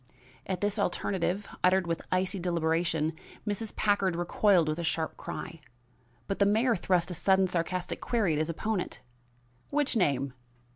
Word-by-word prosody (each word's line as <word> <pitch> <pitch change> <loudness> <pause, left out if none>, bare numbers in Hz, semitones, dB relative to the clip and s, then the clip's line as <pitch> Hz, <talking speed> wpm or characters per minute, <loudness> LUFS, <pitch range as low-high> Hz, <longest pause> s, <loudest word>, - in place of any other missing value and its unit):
At 185 -2 -2
this 205 +1 0
alternative, 195 0 -1 0.2
uttered 185 0 +4
with 165 -1 -2
icy 185 +1 +1
deliberation, 165 -2 0 0.3
Mrs. 210 +1 -2
Packard 200 -4 +2
recoiled 175 0 +3
with 155 +2 -1
a - - -2
sharp 160 -1 -1
cry; 170 -1 -7 0.7
but 195 - -3
the 200 - +5
mayor 225 +4 +3
thrust 180 -2 +1
a - - -2
sudden 190 +3 +3
sarcastic 180 0 -2
query 215 -9 +1
at 150 - 0
his 155 +1 0
opponent: 200 +3 -2 0.7
"Which 290 -2 +1
name? 140 - +1
180 Hz, 150 wpm, -29 LUFS, 165-200 Hz, 0.7 s, the